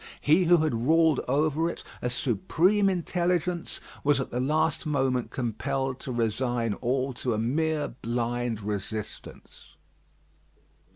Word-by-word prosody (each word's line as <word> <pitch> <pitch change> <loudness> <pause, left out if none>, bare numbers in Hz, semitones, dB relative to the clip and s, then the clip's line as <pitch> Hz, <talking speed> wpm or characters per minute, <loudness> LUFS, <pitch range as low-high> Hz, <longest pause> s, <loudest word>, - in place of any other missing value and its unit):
He 160 +5 +4
who 175 +1 +6
had 155 - +1
ruled 160 -2 +4
over 155 +4 +1
it, - - -7 0.2
a 125 - -1
supreme 165 - +2
intelligence, 175 -1 -1 0.2
was 145 -1 +3
at 130 - -4
the 125 - -2
last 155 +4 +1
moment 130 -4 0
compelled 130 +2 -2
to 130 - -6
resign 120 0 0
all 130 +4 -1
to 120 -1 -1
a - - -2
mere 150 +6 0
blind 120 -1 -2
resistance. 105 +1 -6
135 Hz, 125 wpm, -27 LUFS, 120-160 Hz, 0.2 s, who